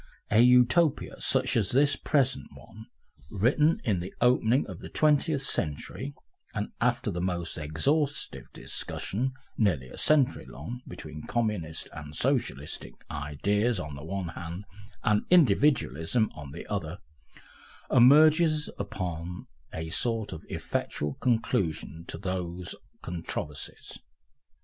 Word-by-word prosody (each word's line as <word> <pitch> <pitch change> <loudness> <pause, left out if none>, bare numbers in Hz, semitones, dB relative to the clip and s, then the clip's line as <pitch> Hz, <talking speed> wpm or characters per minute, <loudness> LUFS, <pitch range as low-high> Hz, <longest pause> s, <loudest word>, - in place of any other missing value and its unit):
A 110 - +5
Utopia 125 +6 +4
such 130 0 +2
as 105 -6 +2
this 140 +2 +4
present 130 - +1
one, 110 +2 -13 0.4
written 140 - +3
in 100 -7 +1
the 90 +2 -5
opening 125 +1 +3
of - - -8
the - - -9
Twentieth 150 -1 +2
Century, 130 - -2 0.4
and - - -2
after - - +1
the 85 - -3
most 90 -2 -2
exhaustive 140 - -1
discussion 130 +6 -3 0.3
nearly 80 - +1
a - - -7
century 150 -4 +3
long 100 - -7
between 75 -3 -7
Communistic 105 -9 -2
and 75 0 -8
Socialistic 130 - -1 0.2
ideas 100 +10 0
on 75 -4 -5
the 70 - -8
one 90 +1 -3
hand, 85 +3 -7 0.4
and 105 0 +3
Individualism 120 - +3
on 75 -3 -9
the - - -8
other, 90 -4 -3 0.9
emerges 155 +4 +6
upon 90 -3 -4 0.3
a 80 0 -5
sort 115 +4 0
of 80 - -8
effectual 75 -1 -2
conclusion 100 - -1
to - - -5
those 90 -2 -3 0.3
controversies. 80 -4 -5
105 Hz, 120 wpm, -28 LUFS, 80-130 Hz, 0.9 s, emerges